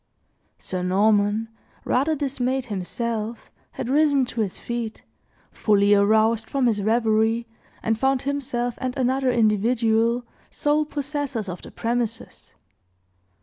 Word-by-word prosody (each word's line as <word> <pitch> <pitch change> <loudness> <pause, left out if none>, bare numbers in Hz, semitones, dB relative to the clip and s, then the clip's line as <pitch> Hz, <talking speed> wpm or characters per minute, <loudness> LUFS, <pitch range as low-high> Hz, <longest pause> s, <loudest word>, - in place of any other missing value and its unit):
Sir 185 -1 -4
Norman, 205 +3 +2 0.4
rather 290 +5 +1
dismayed 265 -2 -1
himself, 220 +4 -4 0.2
had - - -5
risen 285 -1 +3
to 240 -1 -3
his 200 -4 -2
feet, 235 -2 -5 0.5
fully 205 -1 +3
aroused 220 +2 +3
from 275 -2 +1
his 220 -4 +2
reverie, 225 +1 +2 0.4
and 225 0 0
found 265 0 +1
himself 255 -4 -2
and 255 +1 -3
another 260 +1 +1
individual 230 +1 +2 0.2
sole 295 +1 +1
possessors 285 -6 -3
of 180 -1 -6
the - - -10
premises. 230 -1 -4
235 Hz, 115 wpm, -24 LUFS, 215-260 Hz, 0.5 s, risen